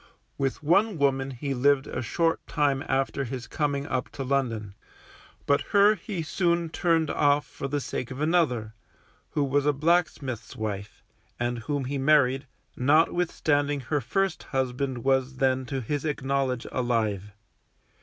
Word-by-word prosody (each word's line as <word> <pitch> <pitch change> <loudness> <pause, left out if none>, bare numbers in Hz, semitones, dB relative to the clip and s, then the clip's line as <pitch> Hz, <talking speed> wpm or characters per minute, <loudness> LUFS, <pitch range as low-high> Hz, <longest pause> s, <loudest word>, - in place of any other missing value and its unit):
With 135 +1 -2
one 195 +5 +3
woman 135 -2 +1
he 135 +2 -4
lived 140 +2 +3
a - - -4
short 165 +7 +1
time 140 -2 +1
after 135 +1 0
his 125 -1 -5
coming 145 +3 -1
up 130 -4 -2
to 135 - -4
London, 120 -7 -1 0.7
but 140 0 +3 0.2
her 205 +1 +7
he 200 -5 -5
soon 170 0 0
turned 165 -1 +1
off 145 0 +3
for 135 - -6
the 145 +1 -1
sake 125 -2 -4
of 130 +1 -7
another, 150 -9 +1 0.6
who 145 - +1
was 140 +1 +1
a 150 - +4
blacksmith's 145 -5 0
wife, 100 -2 -5 0.4
and 120 0 -1
whom 140 +3 -2
he 140 +2 -2
married, 135 -1 +3 0.3
notwithstanding 145 0 +2
her 145 +3 -1
first 195 - 0
husband 130 -1 -2
was 135 0 +1
then 130 -1 +1
to 135 -1 -3
his 145 +5 -2
acknowledge 135 -4 -1
alive. 110 -5 -1
140 Hz, 145 wpm, -27 LUFS, 130-150 Hz, 0.7 s, her